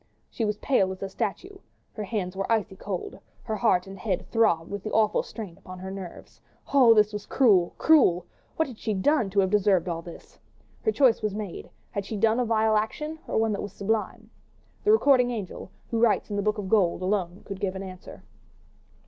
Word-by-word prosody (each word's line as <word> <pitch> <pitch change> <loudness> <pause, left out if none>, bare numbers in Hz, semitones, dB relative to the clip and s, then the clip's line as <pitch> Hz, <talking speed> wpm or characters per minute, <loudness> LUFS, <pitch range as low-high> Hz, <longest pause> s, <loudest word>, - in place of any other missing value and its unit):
She 225 - -2
was 210 -1 -1
pale 195 -8 +1
as 190 +1 -7
a 195 - -3
statue, 380 - -4 0.3
her 215 - -5
hands 190 -3 -3
were 195 +3 -3
icy 210 -3 0
cold, 190 -2 -6 0.2
her 220 - -3
head 185 -6 +2
and 195 0 -10
heart 190 -4 -2
throbbed 200 -8 +2
with 200 -1 -4
the 215 - -5
awful 215 -1 +3
strain 205 -7 -9
upon 185 0 -10
her 190 +1 -7
nerves. 190 -3 -9 0.3
Oh, 250 -5 +7
this 210 0 +4
was 210 -1 -6
cruel! 200 -10 +3
cruel! 185 - +4 0.3
What 320 - +1
had 245 -5 -11
she 215 -2 -2
done 230 +2 +2
to 200 +1 +2
have 190 -1 0
deserved 195 -4 +3
all 165 -1 -3
this? 170 0 -13 0.4
Her 440 - +1
choice 260 - +3
was 210 -2 -2
made: 210 -4 -6 0.2
had 200 - -3
she 215 - -4
done 225 +3 +2
a 250 - +1
vile 220 -1 +2
action 300 +9 -3
or - - -1
one 220 0 +2
that 205 - -2
was 205 -1 -6
sublime? 215 +2 -3 0.5
The 420 - +4
recording 275 - +5
angel, 210 -6 -6 0.2
who 230 - 0
writes 225 -2 +2
in - - -2
the 205 - 0
book 215 +2 0
of 205 -2 -4
gold, 185 -3 +2
alone 185 -2 -1
could 195 -1 -7
give 195 -2 -2
an 190 - -5
answer. 185 -1 -10
210 Hz, 210 wpm, -26 LUFS, 190-225 Hz, 0.5 s, Oh